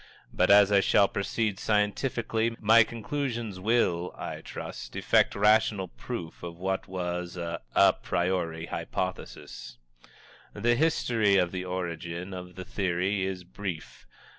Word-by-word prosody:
But 90 - +2
as 100 0 +7
I 100 - +6
shall 100 +1 +4
proceed 105 +1 -2
scientifically, 110 +2 0
my 110 +2 +6
conclusion 120 -1 -3
will, 90 -5 +1
I - - -6
trust, - - -8
effect - - +3
rational 105 -2 +3
proof 90 -5 -7
of 85 -1 -7
what 95 +2 -2
was 90 -1 -4
an 85 -1 -4 0.2
a - - +6
priori 85 -2 -2
hypothesis. - - -5 0.8
The 120 +1 +2
history 120 -8 +2
of 90 -2 +2
the 90 0 -4
origin 90 0 -4
of 90 -1 -8
the 95 - -7
theory 95 +1 -1
is 95 -2 -5
brief. 90 -2 -7
95 Hz, 130 wpm, -28 LUFS, 90-110 Hz, 0.8 s, as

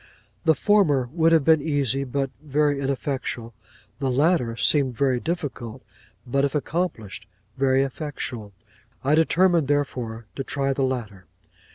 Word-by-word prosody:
The 160 -1 +5
former 150 -13 +3
would 165 -1 +3
have 165 -3 +5
been 160 -2 +5
easy, 140 -3 0
but 135 +1 -2
very 145 -1 +1
ineffectual; 135 -3 -3 0.5
the 135 -2 0
latter 130 -3 +2
seemed 130 -4 +2
very 130 -3 +2
difficult, 140 -8 -4 0.4
but, 135 +3 0
if 140 0 0
accomplished, 150 - -3 0.3
very 135 0 +3
effectual. 130 -6 -5 0.5
I 140 +3 +2
determined 165 0 +3
therefore 125 -6 -2
to 135 - -2
try 135 0 -1
the 135 - -3
latter. 115 -8 -3
140 Hz, 135 wpm, -24 LUFS, 125-150 Hz, 0.5 s, The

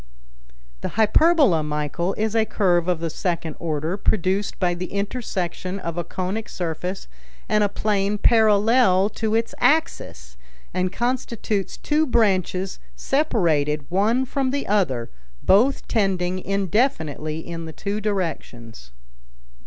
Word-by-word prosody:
"The - - -5
hyperbola, 230 - +4
Michel, 150 +4 -2
is 220 +1 -1
a 225 - +4
curve 180 -5 +1
of 175 -3 0
the 165 - -1
second 165 -3 -3
order, 160 +2 -2
produced 195 0 0
by 180 -2 +1
the 180 +2 -6
intersection 195 -3 -3
of 170 -3 -5
a 175 - -2
conic 190 +6 -4
surface 180 +2 -4 0.4
and 210 -1 +2
a 205 - +2
plane 205 0 0
parallel 215 -2 +4
to 220 0 -2
its 230 0 0
axis, 250 - 0 0.4
and 185 0 0
constitutes 235 -3 -2
two 305 +1 +1
branches 190 -5 +1 0.2
separated 160 - +1
one 220 +8 +2
from 265 0 -1
the 280 +1 -2
other, 155 - 0 0.3
both 240 +8 +3
tending 185 -4 0
indefinitely 185 - -1
in 165 -1 -5
the 160 - -7
two 205 +5 -3
directions." 145 - -4
195 Hz, 125 wpm, -23 LUFS, 170-220 Hz, 0.4 s, hyperbola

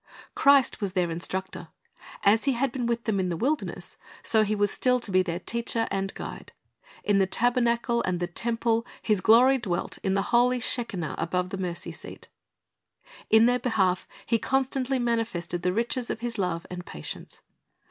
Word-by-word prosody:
Christ 275 -4 +4
was 195 -3 -2
their 180 -3 +1
instructor. 180 +3 -4 0.6
As 215 +5 +4
He 275 - +3
had 260 +2 0
been 245 -2 -2
with 235 0 -1
them 210 -3 0
in 185 -1 0
the 170 - -2
wilderness, 290 - -2 0.3
so 220 - +3
He 215 0 +1
was 205 -1 +1
still 250 -1 +2
to 230 -4 -5
be 185 0 +4
their 175 -2 -2
teacher 230 +2 -2
and 195 0 -1
guide. - - -8 0.5
In 205 -1 +3
the 190 - +3
tabernacle 235 +1 +1
and 180 -4 -1
the 175 - 0
temple 230 +4 0 0.2
His 210 -4 +1
glory 250 +6 +6
dwelt 185 -7 -3
in 190 -1 0
the 195 - +1
holy 250 +1 +4
shekinah 230 -9 -2
above 180 +2 -1
the 195 - -4
mercy 175 -2 -4
seat. - - -11 1.0
In 220 +1 +6
their 245 +1 +3
behalf 190 -8 +1 0.2
He 230 - +1
constantly 265 +1 0
manifested 225 -8 -1
the 180 - +1
riches 235 +4 -1
of 225 - -3
His 235 -2 -3
love 175 -3 -1
and 180 0 -6
patience. 75 - -9
225 Hz, 180 wpm, -27 LUFS, 185-240 Hz, 1.0 s, glory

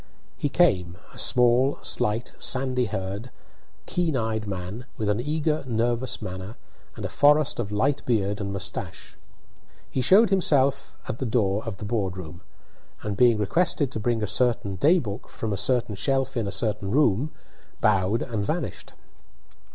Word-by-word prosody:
He 145 - -2
came, 95 - +2 0.2
a - - -14
small, 125 +2 +3
slight, 110 +3 0
sandy 130 -1 +1
haired, 100 +3 -4 0.6
keen 165 -6 0
eyed 110 -2 -2
man, 100 +5 -5
with 110 -3 -1
an 105 +2 +1
eager, 150 +2 -1
nervous 120 +2 -1
manner, 95 +4 -6 0.4
and - - -6
a - - 0
forest 150 -1 +3
of 105 -4 -3
light 135 +7 +1
beard 105 -3 0
and 100 -1 -3
moustache. 95 -2 -6 0.8
He - - -1
just 125 - +1
showed 205 +2 +6
himself 140 -7 +2
at 115 - -4
the 130 - -2
door 110 -3 +1
of 110 -4 -5
the 110 - -7
board 100 -4 -1
room, 85 0 -8 0.6
and, 105 -1 -2
being 120 0 +5
requested 140 - +1
to 110 - -4
bring 115 0 0
a - - +2
certain 110 -3 +1
day 155 - +4
book 110 - -5
from 110 -2 -4
a - - 0
certain 115 +2 +1
shelf 135 +6 0
in 115 -4 -1
a - - -3
certain 105 +1 -1
room, 140 +2 +2 0.5
bowed 105 +1 +2
and 110 -4 -3
vanished. - - -4
115 Hz, 165 wpm, -25 LUFS, 100-130 Hz, 0.8 s, showed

